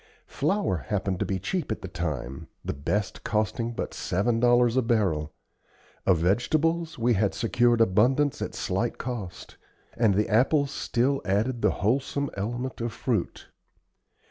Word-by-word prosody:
Flour 200 - 0
happened 95 +1 -2
to - - -1
be 95 - -1
cheap 170 - -3
at 110 - -4
the - - -4
time, 70 -8 -4 0.2
the - - -2
best 95 +9 -2
costing 115 +2 -1
but - - -4
seven 115 +5 0
dollars 120 0 +4
a 130 - +4
barrel; 95 -11 0 0.8
of 95 -3 +5
vegetables, 155 - +1
we 120 0 +2
had 100 -1 +1
secured 120 +1 +2
abundance 120 +8 +3
at - - -4
slight - - -1
cost; 115 -8 -6 0.4
and 110 -5 +3
the 105 +2 +2
apples 135 +6 +3
still 135 +4 0
added 110 +5 0
the - - +4 0.2
wholesome 140 +4 0
element 120 +6 -4
of 115 0 -2
fruit. - - -2
115 Hz, 145 wpm, -27 LUFS, 100-130 Hz, 0.8 s, of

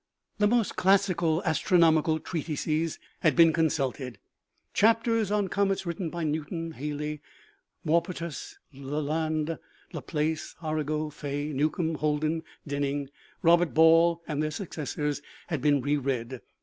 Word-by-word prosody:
The 210 - +5
most 230 -2 +1
classical 180 -3 +3
astronomical 160 -1 +3
treatises 155 0 -2 0.2
had 155 -5 +3
been 165 -1 +6
consulted; 135 -7 -1 0.6
chapters 225 -1 +3
on 205 -1 +1
comets 195 0 0
written 170 0 -3
by 170 +1 -4
Newton, 160 +2 -3
Halley, 150 0 -4 0.6
Maupertuis, 170 0 -1 0.2
Lalande, 155 +3 -2 0.3
Laplace, 155 0 -2
Arago, 155 0 -1
Faye, 145 0 -4
Newcomb, 155 +4 0
Holden, 155 +1 0 0.2
Denning, 140 -1 -2 0.3
Robert 170 0 +4
Ball, 165 +1 +5
and 150 -1 -1
their 155 - 0
successors, 150 -3 -3 0.3
had 160 -7 -2
been 145 -1 +3
re 145 +3 +1
read. 130 -2 -3
155 Hz, 115 wpm, -28 LUFS, 150-170 Hz, 0.6 s, been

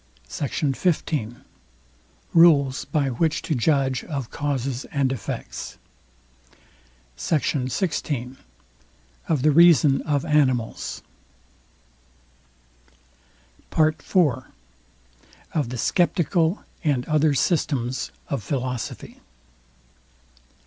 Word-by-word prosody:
SECT. 140 - -2
XV. 150 - -1 1.0
RULES 145 -6 +5
BY 145 -4 0
WHICH 160 +6 0
TO - - -1
JUDGE 135 -1 +1
OF 140 -7 -5
CAUSES 135 -3 -2
AND 140 -2 0
EFFECTS. 125 -7 -6 1.4
SECT. 150 - 0 0.2
XVI 135 -4 -2 0.9
OF 150 -6 +1
THE 155 - +5
REASON 150 -4 +6
OF 145 -1 -1
ANIMALS 130 -7 0 2.7
PART 155 -1 +2
IV. 140 -9 +1 1.1
OF 145 -7 0
THE 125 - -5
SCEPTICAL 170 - +1 0.2
AND 140 -6 +1
OTHER 155 -1 +2
SYSTEMS 130 -4 0 0.2
OF 140 -4 -2
PHILOSOPHY. 125 +2 -4
140 Hz, 80 wpm, -23 LUFS, 130-155 Hz, 2.7 s, REASON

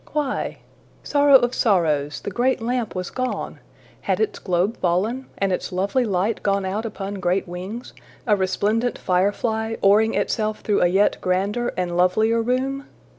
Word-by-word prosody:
Why? 295 -3 -2 0.5
Sorrow 285 -1 +4
of 245 -1 -1
sorrows! 155 - +1
the - - -5
great 250 +6 +1
lamp 235 -1 -2
was 180 -1 -4
gone! 255 -1 -3 0.4
Had - - -1
its 435 - -1
globe 185 +4 0
fallen? 210 +9 0
and 195 -1 0
its 180 - -3
lovely 200 +8 0
light 200 +2 0
gone 200 -1 0
out 210 +4 -2
upon 200 -2 -6
great 180 +1 0
wings, 185 +7 -7 0.3
a 215 -4 +4
resplendent 205 +5 0
firefly, 220 +4 0
oaring 215 +3 +4
itself 215 -1 -1
through 210 - +1
a 175 - +5
yet 195 +4 +2
grander 200 +6 0
and 180 -1 -1
lovelier 220 +6 +3
room? 265 +4 -1
205 Hz, 155 wpm, -22 LUFS, 185-240 Hz, 0.5 s, a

